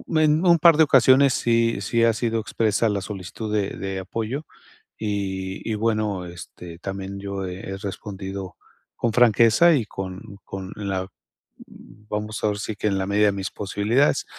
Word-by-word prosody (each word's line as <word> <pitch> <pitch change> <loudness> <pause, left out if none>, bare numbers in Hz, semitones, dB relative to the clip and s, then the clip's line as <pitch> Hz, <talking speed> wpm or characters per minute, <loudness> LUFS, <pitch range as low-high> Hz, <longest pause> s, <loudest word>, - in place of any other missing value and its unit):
En 155 +3 +3
un 170 -2 +6
par 165 -1 +7
de 160 - +7
ocasiones 135 -1 +5
sí 115 -1 +2
sí 115 +4 +1
ha 115 - +5
sido 115 0 -1
expresa 110 0 +1
la 100 -1 -1
solicitud 105 +2 -6
de 100 -2 +1
de 95 -1 -4
apoyo, 115 +9 -4 0.5
y 95 -3 -3
y - - 0
bueno, 105 -4 -1
este, 85 -1 -10
también 95 0 -6
yo 100 -1 -4
he 95 +1 -6
respondido 95 -1 -6 0.4
con 115 -2 -1
franqueza 120 +7 +5
y 120 -6 0
con 95 0 -7
con 95 0 -7
la 95 -2 -3 1.0
vamos 105 +1 -4
ahora 105 -1 0
sí 110 0 -4
que, 105 - -2
en 100 -1 +1
la 95 - -2
media 105 +1 +3
de - - +3
mis 100 -1 -4
posibilidades, 105 +7 +1
105 Hz, 165 wpm, -23 LUFS, 95-115 Hz, 1.0 s, par